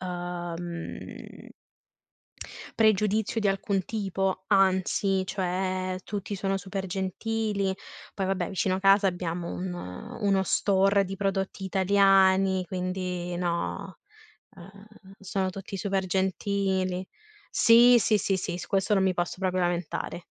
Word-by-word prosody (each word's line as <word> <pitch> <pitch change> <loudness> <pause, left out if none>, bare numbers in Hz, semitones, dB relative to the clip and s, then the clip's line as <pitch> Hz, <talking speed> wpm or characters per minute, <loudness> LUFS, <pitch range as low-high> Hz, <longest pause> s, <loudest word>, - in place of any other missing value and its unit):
uhm 175 -1 -6 1.3
pregiudizio 215 +2 +2
di 205 - +2
alcun 195 -1 -1
tipo, 195 -3 -2
anzi, 190 -1 +2
cioè, 185 -1 -2
tutti 205 0 -4
sono 195 0 -1
super 195 0 -5
gentili. 195 +1 -2 0.4
Poi, 195 - -2
vabbè, 185 -2 -1
vicino 190 -1 0
a 190 - -2
casa 195 +1 +5
abbiamo 175 -1 -2
un 180 0 -4 0.5
uno 195 -2 +2
store 195 +1 +2
di 195 +1 -5
prodotti 195 0 -2
italiani, 190 -1 +3
quindi, 180 -1 -3
no, 170 -1 -3 0.6
ehm, 200 +2 -15
sono 190 -1 -2
tutti 195 +1 -7
super 195 0 -1
gentili. 190 0 -1 0.4
Sì, 240 +1 +7
sì, 215 -1 +2
sì, 195 +1 0
sì 175 -1 -4
su 160 - -7
questo 195 +1 +1
non 195 - +3
mi 185 -1 +2
posso 175 +1 -2
proprio 185 -1 0
lamentare. 175 0 -2
190 Hz, 120 wpm, -27 LUFS, 185-195 Hz, 1.3 s, Sì